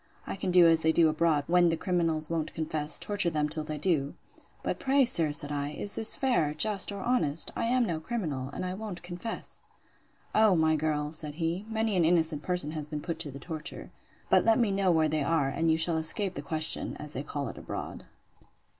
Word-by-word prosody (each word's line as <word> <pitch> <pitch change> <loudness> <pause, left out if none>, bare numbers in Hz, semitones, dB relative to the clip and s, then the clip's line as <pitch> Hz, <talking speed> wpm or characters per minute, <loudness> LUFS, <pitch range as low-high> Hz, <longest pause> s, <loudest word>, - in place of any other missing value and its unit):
I - - -5
can 195 -1 -4
do 180 -1 +7
as 165 -1 +4
they 160 - +3
do 160 0 +4
abroad, 155 -2 +1
when 175 +1 +3
the 165 - -1
criminals 165 -4 -1
won't 165 -2 -3
confess; 155 -1 0
torture 205 -4 0
them 150 -2 -1
till 155 +1 +2
they 155 0 -5
do.—But 150 -3 -4
pray, 270 0 +3
sir, 165 - +3
said 145 0 +2
I, 145 0 -3
is 205 +6 -4
this 225 - +3
fair, 200 - 0
just, 205 +4 +2
or 200 -1 -6
honest? 165 - 0
I - - -2
am 245 +1 +2
no 170 -6 -3
criminal; 155 - -4
and 185 - -5
I 180 - -3
won't 195 -3 -7
confess. 180 +6 -6 0.7
O, 215 -3 +4
my 160 -1 +2
girl! 150 -1 -2
said 155 -2 -3
he, 170 +5 -3
many 220 -2 -1
an 175 - +3
innocent 160 -2 +2
person 180 -3 0
has 155 -2 -4
been 150 -1 -5
put 165 0 -5
to 150 - -3
the 140 - -9
torture. 160 -2 -7 0.4
But - - +4
let 225 0 +3
me 235 -5 +1
know 195 -2 +1
where 160 -2 +2
they 155 0 -1
are, 145 -2 +1
and 165 +4 -1
you 160 - +3
shall 165 0 +2
escape 180 +5 +2
the 140 - -6
question, 155 +2 +3
as 150 0 -9
they 130 - -4
call 145 -1 -5
it - - -9
abroad. - - -7
165 Hz, 215 wpm, -28 LUFS, 150-185 Hz, 0.7 s, do